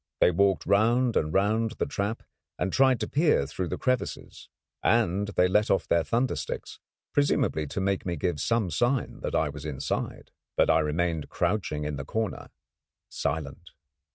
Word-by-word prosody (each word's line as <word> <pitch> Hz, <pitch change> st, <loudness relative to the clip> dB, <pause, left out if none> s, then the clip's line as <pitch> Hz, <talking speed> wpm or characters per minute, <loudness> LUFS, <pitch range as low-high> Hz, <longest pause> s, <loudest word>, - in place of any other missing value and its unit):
They -, -, +5 dB
walked 95 Hz, +2 st, +2 dB
round 115 Hz, +5 st, +3 dB
and 75 Hz, -, +1 dB
round 110 Hz, +5 st, +1 dB
the -, -, 0 dB
trap, 100 Hz, +3 st, -3 dB, 0.3 s
and 90 Hz, +1 st, -2 dB
tried 130 Hz, -2 st, +4 dB
to -, -, -1 dB
peer 150 Hz, -, +2 dB
through 90 Hz, +6 st, -4 dB
the -, -, -3 dB
crevices, 130 Hz, -1 st, -3 dB, 0.3 s
and 105 Hz, -3 st, +2 dB
they 90 Hz, -3 st, +2 dB
let 105 Hz, +3 st, +2 dB
off 95 Hz, -3 st, +1 dB
their 85 Hz, -, +3 dB
thunder 120 Hz, +7 st, 0 dB
sticks, -, -, -6 dB, 0.3 s
presumably 140 Hz, -, +1 dB
to 95 Hz, -, -4 dB
make 95 Hz, 0 st, 0 dB
me 90 Hz, -1 st, -2 dB
give 80 Hz, 0 st, -2 dB
some 115 Hz, -6 st, +1 dB
sign 120 Hz, -, 0 dB
that -, -, -3 dB
I 80 Hz, -, +2 dB
was 70 Hz, 0 st, -8 dB
inside. 70 Hz, -3 st, -4 dB, 0.3 s
But -, -, +4 dB
I 80 Hz, -, +4 dB
remained 80 Hz, 0 st, -1 dB
crouching 85 Hz, -5 st, -1 dB
in 75 Hz, -1 st, -3 dB
the 65 Hz, -, -4 dB
corner 110 Hz, +4 st, -3 dB, 0.6 s
silent. 80 Hz, +2 st, -4 dB
95 Hz, 170 wpm, -27 LUFS, 80-115 Hz, 0.6 s, They